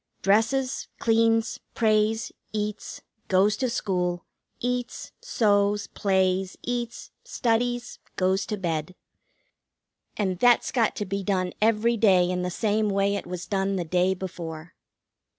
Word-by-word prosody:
Dresses, 235 +6 +1
cleans, 225 0 +2 0.2
prays, 220 0 +2 0.2
eats, 210 0 -4 0.2
goes 200 +3 +3
to 255 -2 0
school, 180 -7 -1 0.3
eats, 245 0 -3
sews, 205 -2 +2
plays, 190 -1 0
eats, 240 -1 -4
studies, 245 - -1 0.2
goes 190 +1 +1
to 210 - -2
bed. 170 -2 -3 1.2
And 190 -4 -1
that's 245 +1 +4
got 230 -5 +1
to 210 - -3
be 195 +1 -3
done 185 -2 -1
every 225 +2 +3
day 190 -5 +4
in 180 0 -1
the 180 - -1
same 215 +3 0
way 200 0 +1
it 200 - -4
was 180 0 -5
done 195 -1 0
the 175 -2 -2
day 180 +3 +2
before. 170 -3 -7
205 Hz, 130 wpm, -26 LUFS, 185-225 Hz, 1.2 s, that's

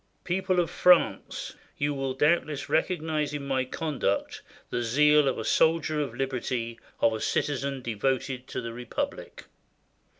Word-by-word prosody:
"People 185 0 0
of 170 - 0
France, 180 -1 +3 0.2
you 145 0 0
will 135 -1 -2
doubtless 150 0 +1
recognize 155 -4 0
in 140 -1 -5
my 135 -1 +1
conduct 135 -8 -2 0.3
the 120 - -1
zeal 150 +5 +4
of 130 - 0
a 110 - -3
soldier 160 -1 +2
of 135 -5 -4
liberty, 125 -3 -3 0.2
of 115 - +4
a 110 - -3
citizen 140 -2 -1
devoted 130 +3 -1
to - - -4
the 115 0 -6
Republic." 120 0 -5
140 Hz, 140 wpm, -27 LUFS, 125-155 Hz, 0.3 s, zeal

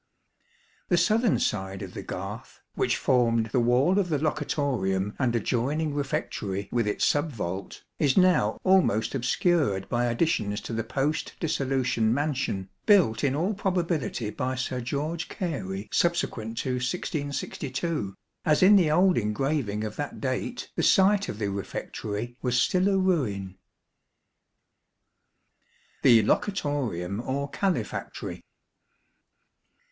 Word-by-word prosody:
The 175 - +3
southern 215 +5 +3
side 95 -1 -2
of - - -8
the - - -5
garth, - - -7
which - - +1
formed 115 -3 +2
the 125 - +2
wall 125 +11 +3
of 185 -3 0
the 155 - +1
locutorium 130 -10 -1
and 125 -3 +1
adjoining 140 +7 0
refectory 105 -8 -3
with 120 -3 +1
its 105 - +1
sub 150 +2 +1
vault, 95 -5 -5 0.2
is 140 -4 +2
now 180 - +4
almost 185 - +3
obscured 130 - +1
by 120 0 +1
additions 115 -5 0
to - - -6
the 115 0 -1
post 145 +6 -1
dissolution 130 -7 0
mansion, 135 -8 -1 0.2
built 165 - +4
in 135 -1 +2
all 180 +8 0
probability 175 - -1
by 130 +3 -2
Sir 130 0 -3
George 150 +7 -3
Oary 105 - -3
subsequent 115 -10 0
to 130 - -1
1662, 140 - -3 0.3
as 155 +2 +3
in 200 +2 +8
the 175 -5 +3
old 180 0 +4
engraving 110 0 -1
of 110 -1 -5
that 145 -1 -4
date 135 - -3
the - - 0
site 200 +1 +4
of - - -5
the 105 -2 -1
refectory 105 +3 -5
was 125 -1 +1
still 185 +8 +2
a 195 - +2
ruin. 115 - 0 2.5
The 115 -3 +6
Locutorium 120 - -1
or 140 +2 -3
Calefactory. 195 -2 -3
135 Hz, 125 wpm, -27 LUFS, 110-165 Hz, 2.5 s, in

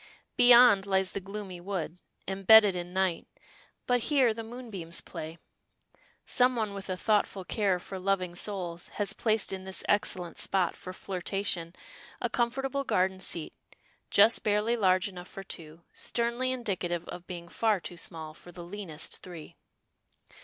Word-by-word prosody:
Beyond 240 -5 +7
lies 190 -1 +2
the - - -3
gloomy 195 -2 -7
wood, 180 -2 -4 0.3
embedded 195 +1 +6
in 175 0 -4
night, 185 -2 0 0.6
but 245 0 +3
here 265 -6 +4
the 225 - -6
moonbeams 220 -8 -6
play. 160 +2 -7 0.9
Some 250 0 +3
one 215 -3 -1
with 195 -1 -7
a 185 - -2
thoughtful 205 -2 +1
care 195 -2 +1
for 190 +2 -7
loving 185 -2 0
souls 175 -2 -4
has 205 -1 +1
placed 215 -3 +1
in 190 -1 -5
this 190 0 -3
excellent 180 -3 0
spot 185 -3 +2
for 185 - -8
flirtation 185 -2 -3 0.4
a - - -2
comfortable 270 +3 0
garden 190 -6 +1
seat, 170 -3 -2 0.6
just 215 +3 +5
barely 210 +3 +2
large 185 -3 +3
enough 180 -2 -9
for 195 - -8
two, 165 -3 -9
sternly 235 +2 -1
indicative 185 -9 -2
of 175 0 -8
being 175 -2 -7
far 215 +2 +1
too 175 - -7
small 160 -2 -7
far 175 - -13
the 175 0 -9
leanest 170 -4 -5
three. 175 -4 -10
190 Hz, 150 wpm, -29 LUFS, 175-215 Hz, 0.9 s, Beyond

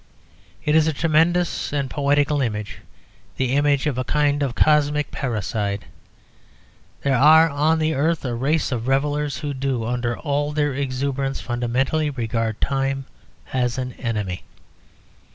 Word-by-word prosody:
It 150 - +2
is 160 0 +4
a 160 - +1
tremendous 165 +3 +1
and 140 -2 -1
poetical 145 +1 +1
image, 105 -4 -3 0.6
the 130 -2 0
image 145 0 +2
of 140 -4 -1
a - - 0
kind 145 +1 +1
of 135 -4 -1
cosmic 150 -1 +2
parricide. 105 -4 -2 1.2
There 140 -1 +2
are 155 +5 +7
on 155 +2 +1
the 160 0 +1
earth 155 +2 0
a 125 - -2
race 140 +6 0
of 120 -1 -2
revellers 145 +1 0
who 145 -1 -4
do, 130 -4 -2
under 120 0 -2
all 145 -1 -1
their 145 -2 0
exuberance, 135 0 -2
fundamentally 130 +6 0
regard 115 -4 -2
time 135 0 -1 0.5
as 125 -1 0
an 125 -1 -3
enemy. 105 -7 -3
140 Hz, 140 wpm, -22 LUFS, 125-150 Hz, 1.2 s, are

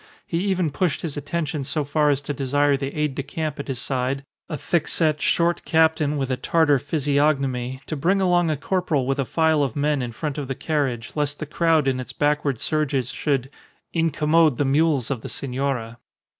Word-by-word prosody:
He 165 - -2
even 185 -5 +1
pushed 175 +2 -1
his 160 -4 -3
attentions 145 -1 -3
so 155 - 0
far 150 +1 +2
as 145 0 +1
to 145 - -3
desire 145 +1 +2
the 135 0 -3
aide 150 -2 0
de 140 - -3
camp 150 +1 -4
at 140 - -5
his 135 -3 -3
side 130 +1 -2 0.3
(a 155 - -3
thick 165 -1 0
set, 155 -2 +1
short 170 0 +2
captain 160 -2 +2
with 135 -2 -2
a 130 - 0
Tartar 145 +1 +3
physiognomy) 140 -4 0
to 155 - -4
bring 180 +7 +2
along 175 -3 +3
a 155 - 0
corporal 165 -4 0
with 135 +2 -1
a 135 - +1
file 160 +1 +2
of 135 -5 -1
men 145 -1 +1
in 120 -1 -3
front 150 +5 -4
of 140 - -4
the 135 - -3
carriage, 135 -8 -2
lest 145 -1 -1
the 155 - -5
crowd 160 -1 +2
in 130 -1 +1
its 130 - -6
backward 145 -4 0
surges 140 -4 0
should 135 -3 -1 0.4
"incommode 160 -2 +3
the 145 - +1
mules 140 -2 +2
of 125 -5 -2
the - - -7
senora." 125 -4 -2
145 Hz, 200 wpm, -23 LUFS, 135-160 Hz, 0.4 s, Tartar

